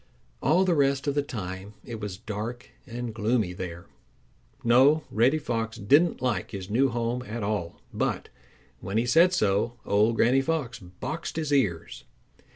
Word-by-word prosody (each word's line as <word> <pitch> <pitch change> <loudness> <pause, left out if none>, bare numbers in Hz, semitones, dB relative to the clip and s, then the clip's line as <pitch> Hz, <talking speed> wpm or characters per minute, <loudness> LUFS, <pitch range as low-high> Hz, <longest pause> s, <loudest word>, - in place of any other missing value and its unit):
All 170 +7 +3
the 180 - +3
rest 140 -2 +2
of 145 - +1
the 145 - +1
time 100 -6 -6
it 115 -2 -6
was 105 -3 -5
dark 110 +5 -6 0.2
and 120 -1 -5
gloomy 110 -3 0
there. 85 -2 -7 0.8
No, 135 +6 +5
Reddy 120 +8 +3
Fox 115 -6 -3
didn't 145 - +3
like 110 -8 -1
his 95 -2 -7
new 135 +5 +3
home 120 +1 -2
at 115 -2 -5
all, 100 -5 -3
but - - -2 0.5
when 95 +4 -3
he 115 - +2
said 165 +9 +5
so 105 - +1
old 105 +3 +3
Granny 125 +4 +4
Fox 140 -6 -2
boxed 105 - -6
his 155 -2 -1
ears. 105 -13 0
120 Hz, 160 wpm, -27 LUFS, 105-135 Hz, 0.8 s, No